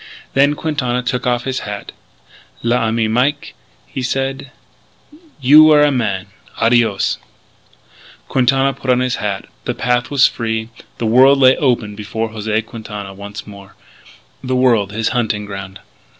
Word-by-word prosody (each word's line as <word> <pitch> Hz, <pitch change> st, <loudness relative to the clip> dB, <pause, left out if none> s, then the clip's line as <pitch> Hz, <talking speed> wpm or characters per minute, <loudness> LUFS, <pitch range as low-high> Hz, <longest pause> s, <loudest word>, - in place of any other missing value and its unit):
Then 140 Hz, +2 st, +3 dB
Quintana 130 Hz, -6 st, -2 dB
took 125 Hz, 0 st, -2 dB
off 120 Hz, -1 st, 0 dB
his 130 Hz, -1 st, -2 dB
hat. 105 Hz, -1 st, -7 dB, 0.7 s
"L'ami 115 Hz, -1 st, +1 dB
Mike," 130 Hz, +6 st, 0 dB, 0.3 s
he 130 Hz, -, -6 dB
said, 135 Hz, +2 st, -2 dB, 0.9 s
"you 145 Hz, +3 st, +7 dB
were 150 Hz, -1 st, +6 dB
a 145 Hz, -, +4 dB
man!... 105 Hz, -8 st, -1 dB, 0.3 s
Adios!" 115 Hz, -4 st, +2 dB, 1.1 s
Quintana 135 Hz, +1 st, +2 dB
put 135 Hz, 0 st, -8 dB
on 125 Hz, -1 st, +4 dB
his 125 Hz, -1 st, -1 dB
hat. 100 Hz, -2 st, -3 dB, 0.2 s
The -, -, -2 dB
path 120 Hz, 0 st, 0 dB
was 140 Hz, -2 st, +4 dB
free. 110 Hz, -1 st, -2 dB, 0.3 s
The 115 Hz, -, -3 dB
world 130 Hz, +5 st, +5 dB
lay 130 Hz, -1 st, +6 dB
open 120 Hz, -6 st, 0 dB
before 110 Hz, +2 st, -4 dB
José 110 Hz, 0 st, -2 dB
Quintana 105 Hz, -4 st, -8 dB
once 100 Hz, +1 st, -9 dB
more; 100 Hz, -1 st, -13 dB, 0.7 s
the 130 Hz, 0 st, -1 dB
world, 115 Hz, -6 st, +2 dB
his 110 Hz, +2 st, -1 dB
hunting 110 Hz, -4 st, -1 dB
ground. 100 Hz, -1 st, -8 dB
120 Hz, 140 wpm, -17 LUFS, 105-130 Hz, 1.1 s, you